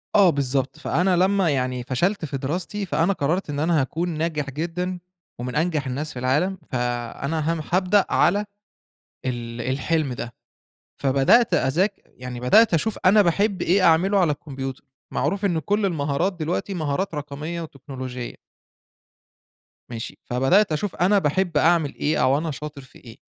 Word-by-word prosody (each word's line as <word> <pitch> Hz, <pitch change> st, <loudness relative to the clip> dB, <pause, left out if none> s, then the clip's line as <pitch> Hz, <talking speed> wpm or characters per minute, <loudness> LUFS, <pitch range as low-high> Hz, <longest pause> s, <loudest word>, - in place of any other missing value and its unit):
آه 200 Hz, -3 st, +7 dB
بالضبط، 135 Hz, -2 st, -1 dB
فأنا 180 Hz, +4 st, +1 dB
لمّا 190 Hz, 0 st, +3 dB
يعني 125 Hz, -3 st, -1 dB
فشلت 170 Hz, +9 st, 0 dB
في 140 Hz, -2 st, -4 dB
دراستي، 175 Hz, +9 st, -3 dB
فأنا 175 Hz, +1 st, +1 dB
قرّرت 165 Hz, +2 st, -1 dB
إن 145 Hz, -1 st, -3 dB
أنا 160 Hz, 0 st, +2 dB
هاكون 165 Hz, +6 st, -2 dB
ناجح 155 Hz, -3 st, -2 dB
جدًا 175 Hz, +5 st, -3 dB, 0.4 s
ومن 125 Hz, 0 st, -4 dB
أنجح 155 Hz, -4 st, 0 dB
الناس 145 Hz, +4 st, -4 dB
في 125 Hz, -, -6 dB
العالم، 150 Hz, +10 st, +1 dB
فأنا 130 Hz, +6 st, -2 dB
هم 165 Hz, -, -3 dB
هابدأ 185 Hz, +2 st, +3 dB
على 205 Hz, +4 st, +3 dB, 0.8 s
ال 120 Hz, -2 st, -4 dB
الحلم 135 Hz, +2 st, -1 dB
ده، 120 Hz, -1 st, -6 dB, 0.7 s
فبدأت 140 Hz, -, +4 dB
أذاك 175 Hz, +10 st, +2 dB
يعني 125 Hz, -1 st, -8 dB
بدأت 210 Hz, -, +5 dB
أشوف 205 Hz, +7 st, 0 dB
أنا 205 Hz, +3 st, +6 dB
باحب 200 Hz, +3 st, +1 dB
إيه 190 Hz, +3 st, +3 dB
أعمله 180 Hz, +4 st, +4 dB
على 175 Hz, -5 st, +3 dB
الكمبيوتر، 135 Hz, -2 st, -6 dB, 0.3 s
معروف 200 Hz, +1 st, -1 dB
إن 175 Hz, -5 st, +1 dB
كلّ 205 Hz, +6 st, 0 dB
المهارات 155 Hz, +1 st, 0 dB
دلوقتي 175 Hz, +3 st, -3 dB
مهارات 160 Hz, +2 st, -2 dB
رقمية 150 Hz, +3 st, -5 dB
وتكنولوجية. 130 Hz, -4 st, -7 dB, 1.6 s
ماشي، 115 Hz, -2 st, -7 dB
فبدأت 135 Hz, +11 st, +3 dB
أشوف 170 Hz, +5 st, -2 dB
أنا 195 Hz, +4 st, +3 dB
باحب 170 Hz, +1 st, 0 dB
أعمل 160 Hz, -1 st, +3 dB
إيه، 150 Hz, -2 st, 0 dB
أو 130 Hz, +2 st, +4 dB
أنا 160 Hz, +1 st, -2 dB
شاطر 150 Hz, 0 st, -7 dB
في 130 Hz, 0 st, -17 dB
إيه، 115 Hz, -3 st, -13 dB
155 Hz, 150 wpm, -23 LUFS, 135-180 Hz, 1.6 s, آه